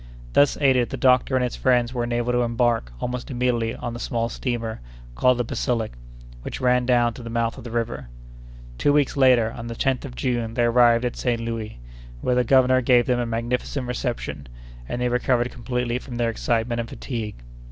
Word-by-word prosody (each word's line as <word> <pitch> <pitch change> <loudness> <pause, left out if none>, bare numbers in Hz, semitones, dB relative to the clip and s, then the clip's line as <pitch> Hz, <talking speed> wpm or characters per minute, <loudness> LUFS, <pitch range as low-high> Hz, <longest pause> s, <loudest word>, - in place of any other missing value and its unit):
Thus 145 - +4
aided, 130 -4 +3
the - - -4
doctor 130 0 +3
and 130 - +2
his 125 - -2
friends 125 -1 +2
were 120 -2 -1
enabled 120 0 -1
to 120 - +2
embark 115 - +1
almost 125 0 -4
immediately 120 -3 0
on 120 - -5
the 120 - -6
small 115 -1 -1
steamer 115 - -3 0.3
called 125 - +3
the 120 - +1
Basilic, 115 -1 -2 0.5
which - - -6
ran 125 -1 +2
down 120 -2 +3
to 125 - -10
the 115 - -7
mouth 115 0 -1
of - - -10
the 120 - -7
river. 115 - -3 0.7
Two 145 - +3
weeks 145 -2 +2
later, 125 -5 +4
on 115 0 -7
the 115 - -5
10th 130 +1 0
of 125 -3 -8
June, 120 -3 -2
they 120 - +2
arrived 120 0 +4
at 120 - -3
Saint 120 -2 -1
Louis, 115 - -5 0.4
where 125 - 0
the 125 0 +3
governor 130 +1 +4
gave 120 -1 +4
them 125 -1 +1
a 120 - -1
magnificent 120 +3 -2
reception, 125 - -4 0.4
and 120 - -3
they 125 - +1
recovered 125 0 +1
completely 125 0 -2
from 125 -2 -9
their 120 -1 0
excitement 115 +1 -1
and 115 -1 -3
fatigue. 115 -5 -5
120 Hz, 200 wpm, -23 LUFS, 115-125 Hz, 0.7 s, Thus